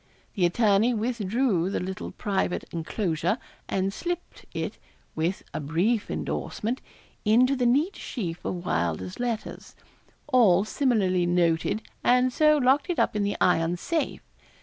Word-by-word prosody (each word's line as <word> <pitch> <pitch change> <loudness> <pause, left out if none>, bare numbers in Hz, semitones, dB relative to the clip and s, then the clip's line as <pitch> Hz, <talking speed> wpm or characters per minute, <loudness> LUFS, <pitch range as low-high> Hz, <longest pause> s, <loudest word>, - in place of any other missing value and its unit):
The 180 -4 +3
attorney 215 +4 +3
withdrew 220 -4 0
the - - -1
little 190 +1 -5
private 195 -3 -1
enclosure, 170 +2 -1 0.3
and 195 0 0
slipt 350 - -5
it, - - -4 0.3
with 165 +4 -1
a 155 - -2
brief 175 +10 0
endorsement, 235 +5 -3 0.4
into 245 +5 +4
the 250 -2 +1
neat 295 +11 +2
sheaf 175 -8 -5
of 180 -1 -4
Wylder's 85 +1 -1
letters, 235 -3 -4 0.5
all 215 -9 +4
similarly 200 -9 +1
noted, 175 +4 +1 0.2
and 250 +1 +4
so 305 +1 +5
locked 275 +4 +3
it 355 - -1
up - - +1
in 210 - +1
the 200 0 -1
iron 175 -1 +2
safe. 320 - -2
205 Hz, 135 wpm, -26 LUFS, 175-250 Hz, 0.5 s, so